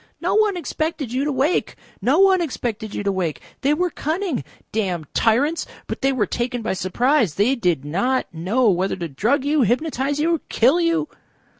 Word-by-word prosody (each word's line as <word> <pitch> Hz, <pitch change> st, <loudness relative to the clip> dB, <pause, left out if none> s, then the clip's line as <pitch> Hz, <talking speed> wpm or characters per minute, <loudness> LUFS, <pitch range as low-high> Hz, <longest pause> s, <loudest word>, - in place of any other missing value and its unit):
"No -, -, 0 dB
one 425 Hz, -3 st, +3 dB
expected 310 Hz, -6 st, -3 dB
you 260 Hz, +2 st, 0 dB
to 300 Hz, -, 0 dB
wake. 275 Hz, +6 st, 0 dB, 0.3 s
No 255 Hz, +10 st, +3 dB
one 380 Hz, -1 st, +5 dB
expected 235 Hz, -8 st, -4 dB
you -, -, -3 dB
to 200 Hz, -, +1 dB
wake. 180 Hz, -5 st, -2 dB, 0.2 s
They 285 Hz, +2 st, +2 dB
were 355 Hz, +2 st, 0 dB
cunning. 320 Hz, -1 st, -2 dB, 0.3 s
Damned 185 Hz, -7 st, -1 dB
tyrants! 275 Hz, +9 st, +2 dB, 0.2 s
But -, -, -5 dB
they 270 Hz, -, +3 dB
were 250 Hz, -6 st, +1 dB
taken 240 Hz, +2 st, -3 dB
by 220 Hz, -, -1 dB
surprise. 210 Hz, -, +1 dB
They 215 Hz, +7 st, +3 dB
did 175 Hz, -, 0 dB
not 225 Hz, -, 0 dB
know 200 Hz, +10 st, +1 dB
whether 185 Hz, +2 st, 0 dB
to 175 Hz, -2 st, -4 dB
drug 235 Hz, -, 0 dB
you, 295 Hz, 0 st, +2 dB
hypnotise 275 Hz, +4 st, 0 dB
you, 330 Hz, +1 st, +1 dB
kill 270 Hz, +10 st, +3 dB
you." 330 Hz, -2 st, +1 dB
255 Hz, 180 wpm, -22 LUFS, 205-310 Hz, 0.3 s, one